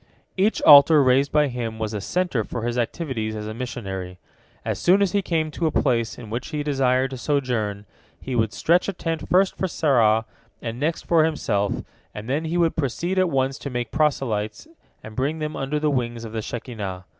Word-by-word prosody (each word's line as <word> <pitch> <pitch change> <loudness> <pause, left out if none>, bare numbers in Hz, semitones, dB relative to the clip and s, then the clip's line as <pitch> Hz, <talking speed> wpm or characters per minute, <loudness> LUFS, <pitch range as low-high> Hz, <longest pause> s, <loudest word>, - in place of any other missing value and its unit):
Each 200 +3 +1
altar 145 0 +8
raised 135 +2 +3
by 150 -1 +3
him 120 -3 -4
was 110 -1 -3
a 105 - -3
centre 175 - -1
for 115 +2 -5
his 120 0 -1
activities 120 -3 -2
as 105 0 -5
a 110 - -5
missionary. 95 -7 -6 0.5
As - - -2
soon 185 +3 +4
as 200 -3 +2
he 205 - +1
came 160 -4 -1
to 165 +1 -1
a - - 0
place 120 -6 0
in 110 -3 -10
which 120 +3 -3
he 150 -2 -3
desired 135 -2 +1
to 130 - -5
sojourn, 120 -8 -1 0.3
he 130 - -5
would 110 -2 +1
stretch 175 +9 +2
a - - -2
tent 165 -3 -4
first 185 +1 +3
for 190 - -1
Sarah, 115 -10 +2 0.3
and 115 +1 -5
next 160 +4 -1
for 165 -2 +3
himself, 105 -10 -1 0.3
and 105 +1 -7
then 145 +5 -1
he 165 +2 -1
would 170 -2 +2
proceed 170 +6 -1
at 185 -1 +3
once 135 0 0
to 140 - -5
make 120 -3 -3
proselytes 130 - -1 0.4
and 110 0 -10
bring 140 +6 -1
them 155 0 -4
under 135 +3 -2
the 150 0 +1
wings 120 -3 -2
of 110 - -8
the 110 0 -3
Shekinah. 105 -6 -6
130 Hz, 205 wpm, -23 LUFS, 115-155 Hz, 0.5 s, altar